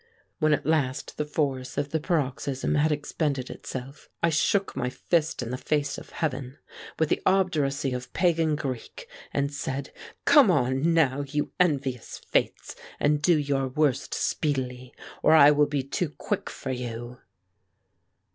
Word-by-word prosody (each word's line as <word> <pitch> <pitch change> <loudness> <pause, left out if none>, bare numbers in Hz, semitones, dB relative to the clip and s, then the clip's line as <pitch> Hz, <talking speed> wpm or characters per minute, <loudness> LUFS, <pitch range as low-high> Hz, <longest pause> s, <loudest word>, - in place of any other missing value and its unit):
When 155 -2 +3
at 150 - +1
last 145 -4 0
the 150 - -1
force 140 -3 -2
of 145 0 -1
the 160 - +1
paroxysm 140 -5 -1
had 155 +1 +3
expended 145 -2 -2
itself, 135 +2 -8
I 170 - +4
shook 195 +5 +1
my 125 - -1
fist 160 +1 0
in 120 - -5
the 125 - -3
face 145 -2 -1
of - - -14
heaven, 135 -3 -3 0.4
with 160 -1 +1
the - - +1
obduracy 150 -8 +1
of 125 0 -5
Pagan 165 -3 +2
Greek, 145 - -6 0.2
and 140 0 -1
said: 140 -1 -4 0.3
"Come 285 -8 +7
on 135 +1 +2
now, 145 -4 +3
you 150 +1 -2
envious 140 -8 0
Fates, - - -1 0.2
and 145 0 +2
do 165 +2 +4
your 140 -2 0
worst 140 0 0
speedily, 130 -4 -2 0.3
or 155 - +5
I 150 -2 +8
will 150 0 +4
be 145 -2 -1
too 150 +5 -2
quick - - -3
for 135 - -5
you!" 120 -1 -5
145 Hz, 155 wpm, -26 LUFS, 130-155 Hz, 0.4 s, I